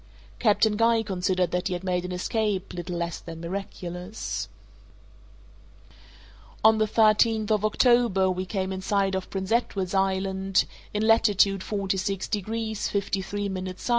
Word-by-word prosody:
Captain 215 Hz, -1 st, +3 dB
Guy 230 Hz, 0 st, +3 dB
considered 185 Hz, -3 st, 0 dB
that 180 Hz, 0 st, -1 dB
he 180 Hz, -, -1 dB
had 175 Hz, -, -6 dB
made 180 Hz, -1 st, 0 dB
an 180 Hz, -, -5 dB
escape 195 Hz, +1 st, -1 dB
little 175 Hz, 0 st, -4 dB
less 170 Hz, 0 st, -3 dB
than 165 Hz, -1 st, -9 dB
miraculous. 180 Hz, +2 st, -5 dB, 2.1 s
On 220 Hz, 0 st, +6 dB
the 215 Hz, -, +2 dB
thirteenth 220 Hz, 0 st, +3 dB
of 210 Hz, -1 st, +2 dB
October 225 Hz, -3 st, +3 dB
we 185 Hz, +1 st, -3 dB
came 190 Hz, 0 st, -2 dB
in 190 Hz, -, -5 dB
sight 195 Hz, 0 st, +1 dB
of 190 Hz, 0 st, -3 dB
Prince 190 Hz, 0 st, -4 dB
Edward's 200 Hz, -6 st, 0 dB
Island, 190 Hz, 0 st, +1 dB, 0.3 s
in 210 Hz, +1 st, -1 dB
latitude 205 Hz, -3 st, +4 dB
46 195 Hz, -1 st, -2 dB
degrees 220 Hz, +1 st, -2 dB
53' 200 Hz, 0 st, -2 dB, 0.2 s
S. 185 Hz, +6 st, -7 dB
195 Hz, 135 wpm, -26 LUFS, 185-215 Hz, 2.1 s, On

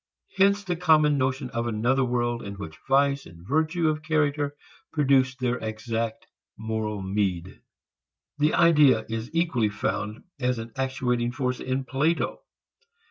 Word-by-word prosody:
Hence 200 Hz, +1 st, +3 dB
the 180 Hz, -3 st, -2 dB
common 155 Hz, -4 st, +4 dB
notion 130 Hz, 0 st, -1 dB
of 115 Hz, 0 st, -2 dB
another 120 Hz, +4 st, +1 dB
world 120 Hz, -1 st, -1 dB
in 100 Hz, 0 st, -7 dB
which 80 Hz, -6 st, -8 dB
vice 140 Hz, +1 st, +2 dB
and 85 Hz, +2 st, -15 dB
virtue 160 Hz, +4 st, +1 dB
of 155 Hz, 0 st, 0 dB
character 150 Hz, -2 st, 0 dB, 0.4 s
produce 135 Hz, -4 st, +3 dB
their 125 Hz, -1 st, -1 dB
exact 110 Hz, 0 st, -3 dB, 0.3 s
moral 110 Hz, -2 st, -3 dB
meed. 95 Hz, -2 st, -2 dB, 0.8 s
The 150 Hz, +1 st, +3 dB
idea 150 Hz, -9 st, +5 dB
is 115 Hz, +2 st, -4 dB
equally 160 Hz, -10 st, +1 dB
found 105 Hz, +1 st, -3 dB, 0.2 s
as 125 Hz, -1 st, 0 dB
an 115 Hz, 0 st, -6 dB
actuating 125 Hz, -2 st, -1 dB
force 125 Hz, 0 st, -2 dB
in 130 Hz, +1 st, -2 dB
Plato. 150 Hz, +5 st, 0 dB
130 Hz, 135 wpm, -26 LUFS, 110-150 Hz, 0.8 s, idea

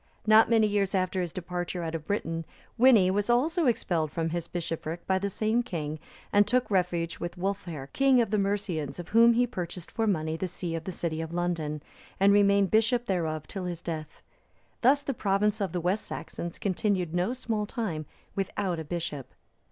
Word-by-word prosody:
Not 220 Hz, +1 st, +6 dB
many 225 Hz, -2 st, +5 dB
years 205 Hz, -2 st, +1 dB
after 185 Hz, 0 st, 0 dB
his 175 Hz, -2 st, -3 dB
departure 175 Hz, 0 st, -4 dB
out 165 Hz, -1 st, -3 dB
of 160 Hz, -2 st, -5 dB
Britain, 165 Hz, -5 st, -2 dB, 0.4 s
Wini 225 Hz, -7 st, +6 dB
was 205 Hz, +3 st, 0 dB
also 300 Hz, +7 st, +2 dB
expelled 165 Hz, -9 st, 0 dB
from 165 Hz, 0 st, -1 dB
his 170 Hz, 0 st, -3 dB
bishopric 165 Hz, -1 st, -4 dB
by 190 Hz, 0 st, +2 dB
the 200 Hz, +1 st, -1 dB
same 220 Hz, +4 st, +1 dB
king, 155 Hz, -9 st, -4 dB, 0.3 s
and 205 Hz, 0 st, +5 dB
took 250 Hz, -2 st, +1 dB
refuge 175 Hz, -3 st, 0 dB
with 175 Hz, +1 st, -5 dB
Wulfhere, 180 Hz, -6 st, -3 dB
king 270 Hz, -2 st, +4 dB
of 230 Hz, -4 st, +1 dB
the 215 Hz, -, +2 dB
Mercians, 195 Hz, -7 st, -1 dB
of 175 Hz, -, -7 dB
whom 230 Hz, +1 st, +6 dB
he 245 Hz, +2 st, +3 dB
purchased 180 Hz, -6 st, -6 dB
for 225 Hz, -1 st, 0 dB
money 160 Hz, -5 st, 0 dB
the 185 Hz, -, -2 dB
see 175 Hz, -1 st, -4 dB
of 165 Hz, 0 st, -4 dB
the 185 Hz, -, -3 dB
city 165 Hz, -2 st, -3 dB
of 160 Hz, 0 st, -5 dB
London,(329) 165 Hz, -4 st, -1 dB, 0.4 s
and 200 Hz, +1 st, +6 dB
remained 200 Hz, -1 st, +4 dB
bishop 230 Hz, +2 st, +3 dB
thereof 160 Hz, -6 st, -1 dB
till 190 Hz, -2 st, -5 dB
his 175 Hz, -2 st, -4 dB
death. 155 Hz, -2 st, -6 dB, 0.6 s
Thus 280 Hz, +4 st, +4 dB
the 275 Hz, -, -2 dB
province 210 Hz, 0 st, +1 dB
of 195 Hz, -, -1 dB
the 180 Hz, -, -1 dB
West 180 Hz, +5 st, -1 dB
Saxons 170 Hz, 0 st, -6 dB
continued 185 Hz, -3 st, 0 dB
no 180 Hz, +7 st, +1 dB
small 225 Hz, -5 st, -2 dB
time 170 Hz, -, -3 dB, 0.3 s
without 195 Hz, -2 st, -2 dB
a -, -, -4 dB
bishop. 150 Hz, -4 st, -5 dB
185 Hz, 190 wpm, -28 LUFS, 165-215 Hz, 0.6 s, Not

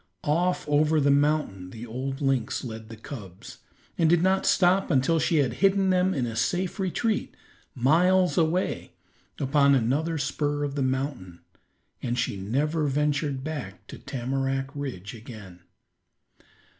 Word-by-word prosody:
Off 175 Hz, +4 st, 0 dB
over 150 Hz, +2 st, +3 dB
the 140 Hz, -1 st, +3 dB
mountain 140 Hz, -11 st, +1 dB
the 115 Hz, +4 st, -8 dB
old 135 Hz, +4 st, -5 dB
lynx 135 Hz, -5 st, 0 dB
led 110 Hz, -3 st, -7 dB
the 115 Hz, -, -9 dB
cubs, 105 Hz, -7 st, -10 dB, 0.4 s
and 165 Hz, -2 st, +4 dB
did 170 Hz, 0 st, +4 dB
not 190 Hz, +1 st, +2 dB
stop 185 Hz, +1 st, +3 dB
until 140 Hz, +5 st, +2 dB
she 170 Hz, -, +1 dB
had 135 Hz, -6 st, +2 dB
hidden 195 Hz, -1 st, +3 dB
them 185 Hz, +1 st, +2 dB
in 135 Hz, -8 st, -1 dB
a 115 Hz, -2 st, -5 dB
safe 175 Hz, -, -1 dB
retreat 210 Hz, +4 st, -1 dB, 0.4 s
miles 175 Hz, +8 st, +3 dB
away, 170 Hz, +2 st, 0 dB, 0.5 s
upon 140 Hz, 0 st, +4 dB
another 145 Hz, +7 st, 0 dB
spur 145 Hz, 0 st, -1 dB
of 145 Hz, -1 st, -2 dB
the 140 Hz, -, -2 dB
mountain, 130 Hz, -, -3 dB, 0.6 s
and 120 Hz, 0 st, -2 dB
she -, -, -1 dB
never 145 Hz, +11 st, -1 dB
ventured 145 Hz, -1 st, 0 dB
back 135 Hz, -, -6 dB
to -, -, -10 dB
Tamarack 135 Hz, +1 st, -2 dB
Ridge 130 Hz, -, -6 dB
again. 110 Hz, -6 st, -11 dB
140 Hz, 145 wpm, -26 LUFS, 125-160 Hz, 0.6 s, and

